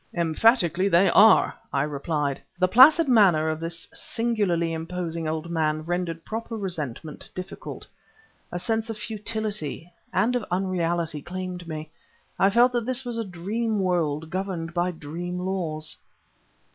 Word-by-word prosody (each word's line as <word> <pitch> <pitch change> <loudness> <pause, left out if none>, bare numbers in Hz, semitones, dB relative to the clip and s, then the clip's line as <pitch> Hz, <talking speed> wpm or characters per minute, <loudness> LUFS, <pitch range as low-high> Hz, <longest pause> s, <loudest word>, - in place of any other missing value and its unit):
"Emphatically 175 +2 +3
they 175 0 +5
are!" 220 +1 +6 0.2
I 140 -1 +1
replied. 145 -1 -2 0.2
The 185 +1 +3
placid 285 - +7
manner 190 -10 +5
of 155 0 -2
this 165 0 -5
singularly 200 -8 0
imposing 165 0 -4
old 160 +2 -3
man 155 -2 0
rendered 170 -2 -3
proper 225 +1 -5
resentment 155 - -5
difficult. 185 +1 -7 0.7
A 175 - -3
sense 220 +5 -1
of 225 - -4
futility, 210 - -3 0.2
and 205 +7 +2
of 245 - 0
unreality, 175 -4 -1
claimed 180 +1 -6
me; 155 -1 -6 0.5
I 195 - +5
felt 240 +4 +5
that 240 -1 -2
this 255 0 +1
was 235 -1 -3
a - - 0
dream 210 +4 -2
world, 160 -4 0
governed 185 -3 -3
by 175 +1 +1
dream 175 +2 -5
laws. 165 -4 -2
180 Hz, 140 wpm, -25 LUFS, 160-210 Hz, 0.7 s, placid